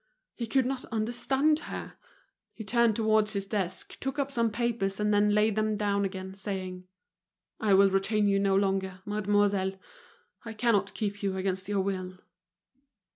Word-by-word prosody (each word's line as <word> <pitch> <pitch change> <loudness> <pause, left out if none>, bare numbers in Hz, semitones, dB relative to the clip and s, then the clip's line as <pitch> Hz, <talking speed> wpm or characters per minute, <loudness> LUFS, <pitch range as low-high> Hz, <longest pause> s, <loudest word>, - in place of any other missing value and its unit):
He 235 - -5
could 265 +2 +2
not 260 0 -2
understand 255 +7 +1
her. - - -6 0.6
He 220 - -7
turned 235 +1 +3
towards 215 -1 +2
his 200 -1 -2
desk, 190 -3 -3
took 270 +2 -3
up 280 -1 -1
some 235 -3 +1
papers 220 -3 -1
and 210 0 +2
then 205 0 +4
laid 210 0 +3
them 215 0 +1
down 200 -1 0
again, 190 0 -5
saying: 185 -2 -5 0.7
"I 205 -3 +3
will 195 0 +5
retain 205 +2 +2
you 195 0 +3
no 195 -1 +2
longer, 195 -1 0
mademoiselle; 205 -2 +1 0.7
I 225 -1 -7
cannot 215 -3 +1
keep 205 -2 -3
you 195 -2 -1
against 190 0 -2
your 200 -1 +1
will." 185 -1 -3
205 Hz, 160 wpm, -29 LUFS, 195-220 Hz, 0.7 s, will